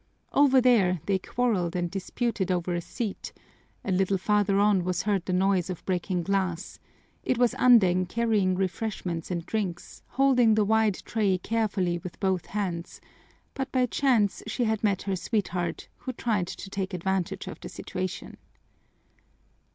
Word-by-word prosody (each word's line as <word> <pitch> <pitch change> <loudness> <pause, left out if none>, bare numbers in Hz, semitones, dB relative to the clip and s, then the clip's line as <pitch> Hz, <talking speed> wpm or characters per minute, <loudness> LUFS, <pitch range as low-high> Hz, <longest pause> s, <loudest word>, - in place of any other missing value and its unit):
Over 275 -2 +5
there 200 -8 +4
they 195 -1 +1
quarreled 190 -6 -1
and 175 -1 -1
disputed 195 +1 -2
over 175 0 -1
a 175 - -1
seat, 215 +3 -5 0.5
a 195 - -1
little 190 +1 +2
farther 205 0 +2
on 200 -2 +3
was 180 0 -1
heard 200 -3 0
the - - -1
noise 185 -1 +2
of 180 - -6
breaking 180 -1 -1
glass; 190 -1 -2 0.4
it 255 - 0
was 245 -1 +3
Andeng 185 -8 +5
carrying 215 -4 +1
refreshments 185 -2 -3
and 170 -2 -3
drinks, 185 -4 -4
holding 250 -5 +4
the 215 -1 +3
wide 220 -1 +3
tray 205 -4 +1
carefully 190 -4 -1
with 175 +1 -9
both 190 -3 0
hands, 180 -5 -4 0.5
but 270 0 -4
by 255 -1 +3
chance 235 -5 +1
she 240 +3 -1
had 220 -2 0
met 200 -3 +1
her 195 -1 -1
sweetheart, 185 -3 -2
who 255 - -6
tried 215 -7 -1
to 195 - -7
take 190 -2 -3
advantage 185 0 -2
of - - -8
the - - -8
situation. 185 0 -5
195 Hz, 155 wpm, -27 LUFS, 180-220 Hz, 0.5 s, Over